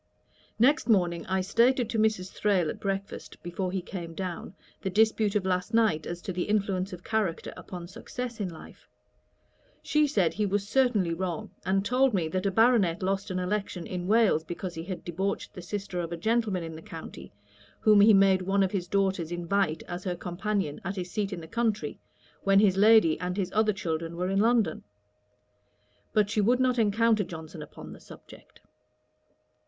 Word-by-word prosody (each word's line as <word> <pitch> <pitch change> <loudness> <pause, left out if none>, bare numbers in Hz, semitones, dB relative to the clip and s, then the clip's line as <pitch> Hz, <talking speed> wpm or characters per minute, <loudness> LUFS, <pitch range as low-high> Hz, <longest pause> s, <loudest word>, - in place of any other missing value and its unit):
Next 260 +3 +3
morning 175 -5 +2
I 190 0 +1
stated 235 +5 +2
to 225 - 0
Mrs. 215 -4 +1
Thrale 190 -6 +1
at - - -9
breakfast, 195 0 -4
before 180 +1 -3
he 190 -1 -3
came 170 -3 -7
down, 180 -1 -5 0.3
the 195 - -2
dispute 215 +1 +2
of 200 -2 +1
last 180 +3 -1
night 215 -9 +2
as 175 0 -6
to 190 - -4
the 175 0 -2
influence 200 -2 0
of 180 -1 -9
character 215 -7 -2
upon 175 -2 -8
success 240 +5 -7
in 195 -3 -2
life. 160 -2 -13 0.9
She 300 0 +2
said 190 - +1
he 210 +4 0
was 200 +1 -1
certainly 215 -9 +2
wrong; 175 -1 -4 0.2
and 195 +1 +1
told 255 +1 +3
me, 170 -4 0
that 185 +4 -1
a - - +3
Baronet 210 -5 +3
lost 195 +2 -1
an 185 - -2
election 185 -1 -2
in 180 -1 -4
Wales, 215 -7 +3
because 175 +2 -6
he 165 - -6
had 185 -1 -6
debauched 190 +4 -3
the 185 - -8
sister 195 0 -4
of 170 -1 -3
a 170 - -3
gentleman 220 -2 0
in 165 -1 -7
the 160 - -9
county, 160 0 -10 0.5
whom 210 -2 +6
he 215 +2 +7
made 195 -2 +5
one 195 +2 +2
of 190 - 0
his 180 -3 -2
daughters 190 -4 0
invite 175 -1 0
as 175 +1 -6
her 180 -2 -2
companion 180 -2 -3
at 195 +3 -3
his 180 -2 -5
seat 210 -2 -2
in 180 -3 -5
the 160 - -10
country, 225 +2 -1 0.4
when 195 0 +4
his 200 -3 +4
lady 210 -5 +5
and 180 +1 -3
his 185 -2 -1
other 215 0 +3
children 165 -3 -3
were 180 +2 -2
in 195 - +2
London. 225 -6 +2 1.3
But 210 -1 +2
she 215 -1 +2
would 245 +5 +3
not 255 -1 +2
encounter 220 0 +3
Johnson 160 -2 -9
upon 150 - -10
the - - -13
subject. - - -15
195 Hz, 190 wpm, -28 LUFS, 175-215 Hz, 1.3 s, he